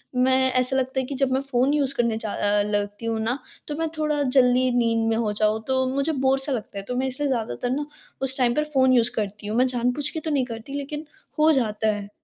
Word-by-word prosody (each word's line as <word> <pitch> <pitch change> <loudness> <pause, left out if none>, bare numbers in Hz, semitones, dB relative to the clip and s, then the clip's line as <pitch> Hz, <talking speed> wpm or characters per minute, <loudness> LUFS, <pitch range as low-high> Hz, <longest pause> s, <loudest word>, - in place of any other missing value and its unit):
मैं 260 +1 +3
ऐसा 255 +1 +2
लगता 265 0 -1
है 260 - -1
कि 275 - -5
जब 270 -1 0
मैं 265 - +1
फ़ोन 275 0 +1
यूज़ 280 -2 +1
करने 235 -3 +1
जा 220 -2 -4
अ, 205 0 +1
लगती 205 +1 -2
हूँ 225 -1 -1
न 250 - 0 0.3
तो 295 - -4
मैं 325 0 0
थोड़ा 300 -1 0
जल्दी 255 -1 +3
नींद 230 -1 +2
में 225 - +1
हो 220 -2 0
जाऊँ। 215 +1 +1
तो 260 0 +1
मुझे 280 +3 +1
बोर 270 -2 +1
सा 270 +2 0
लगता 220 -5 -4
है 195 - -4
तो 250 - -3
मैं 260 +1 0
इसलिए 275 +2 -1
ज़्यादातर 230 - -2
न 295 - -3 0.4
उस 270 0 +2
टाइम 245 -2 +2
पर 300 - +2
फ़ोन 260 -1 +4
यूज़ 240 -1 +4
करती 205 -1 -4
हूँ। 215 +2 -2
मैं 255 +1 +4
जानबूझ 250 +3 0
के 320 - -4
तो 315 0 -4
नहीं 270 -3 +1
करती 230 +2 -8
लेकिन 295 +2 -5 0.3
हो 310 +1 +6
जाता 220 -5 0
है। 205 -1 -6
255 Hz, 250 wpm, -24 LUFS, 225-275 Hz, 0.4 s, हो